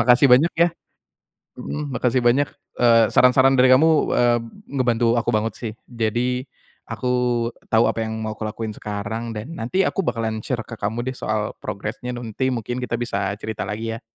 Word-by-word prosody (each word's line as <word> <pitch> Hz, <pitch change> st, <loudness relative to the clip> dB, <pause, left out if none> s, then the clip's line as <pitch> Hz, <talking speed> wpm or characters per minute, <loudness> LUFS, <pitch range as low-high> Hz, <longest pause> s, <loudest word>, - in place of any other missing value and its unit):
Makasih 125 Hz, +3 st, +5 dB
banyak, 145 Hz, +7 st, +6 dB
ya? 170 Hz, +1 st, +5 dB, 0.9 s
Mhm. 145 Hz, -1 st, -5 dB
Makasih 125 Hz, 0 st, +1 dB
banyak, 135 Hz, +4 st, +3 dB, 0.3 s
eee, 115 Hz, -2 st, +6 dB
saran-saran 130 Hz, +1 st, +5 dB
dari 130 Hz, -, +6 dB
kamu, 150 Hz, +5 st, +6 dB, 0.3 s
eee, 120 Hz, -1 st, +4 dB, 0.3 s
ngebantu 120 Hz, -3 st, +2 dB
aku -, -, -7 dB
banget 110 Hz, +1 st, -1 dB
sih. 115 Hz, -3 st, -4 dB
Jadi, 120 Hz, +2 st, -1 dB, 0.5 s
aku 125 Hz, -, -3 dB, 0.6 s
tahu 110 Hz, +1 st, +4 dB
apa -, -, -4 dB
yang 110 Hz, -, -4 dB
mau 110 Hz, -, -3 dB
aku 110 Hz, 0 st, -5 dB
lakuin 110 Hz, 0 st, -5 dB
sekarang, 110 Hz, +3 st, -5 dB
dan 115 Hz, +10 st, -6 dB
nanti 185 Hz, +12 st, +1 dB
aku -, -, 0 dB
bakalan 115 Hz, -, -2 dB
share 115 Hz, 0 st, -3 dB
ke 115 Hz, -, -14 dB
kamu 110 Hz, +4 st, -2 dB
deh -, -, -13 dB
soal 110 Hz, -2 st, -2 dB
progresnya 120 Hz, +5 st, -5 dB
nanti 120 Hz, +2 st, -2 dB
mungkin 120 Hz, 0 st, -3 dB
kita 125 Hz, -2 st, -2 dB
bisa 100 Hz, -4 st, -2 dB
cerita 110 Hz, -2 st, -5 dB
lagi, 110 Hz, +2 st, -3 dB
ya? -, -, -20 dB
120 Hz, 175 wpm, -22 LUFS, 110-125 Hz, 0.9 s, banyak